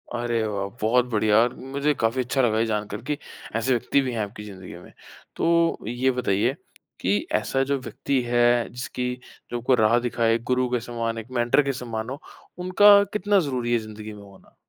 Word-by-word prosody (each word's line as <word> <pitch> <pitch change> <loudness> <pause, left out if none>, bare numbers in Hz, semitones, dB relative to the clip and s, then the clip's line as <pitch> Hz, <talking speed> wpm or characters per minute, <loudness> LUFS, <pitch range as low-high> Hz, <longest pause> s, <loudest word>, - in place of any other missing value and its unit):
अरे 120 -1 -1
वाह! 100 -2 -2
बहुत 120 +3 +3
बढ़िया 105 0 +3
और 120 +2 +3
मुझे 140 +3 -1
काफ़ी 115 +3 +1
अच्छा 125 +2 0
लगा 110 -3 +2
ये 115 - +2
जानकर 105 -1 -3
कि, 150 -1 -3 0.4
ऐसे 115 +3 0
व्यक्ति 125 +3 +2
भी 130 -2 -2
हैं 115 - -3
आपकी 105 +1 -8
ज़िंदगी 95 -3 -10
में। 90 - -14 0.4
तो 170 0 +2
ये 125 +3 +1
बताइए 120 -1 +1 0.5
कि 100 +3 +1 0.2
ऐसा 135 +5 0
जो 140 +1 0
व्यक्ति 130 +1 -2
है, 120 0 +3
जिसकी 125 0 -4 0.4
जो 120 - -1
आपको 125 +2 +2
राह 110 0 +4
दिखाए 115 -1 +1
गुरु 125 0 +2
के 125 0 0
समान, 115 -1 -3
एक 115 +3 -8
मेंटर 120 +3 +3
के 140 0 -1
समान 115 -2 -5
हो, 140 +3 -6 0.4
उनका 200 +3 +6
कितना 205 -1 +2
ज़रूरी 125 -7 -1
है 120 - +3
ज़िंदगी 110 0 -9
में 105 -1 -12
होना? 100 -1 -18
120 Hz, 190 wpm, -24 LUFS, 110-130 Hz, 0.5 s, उनका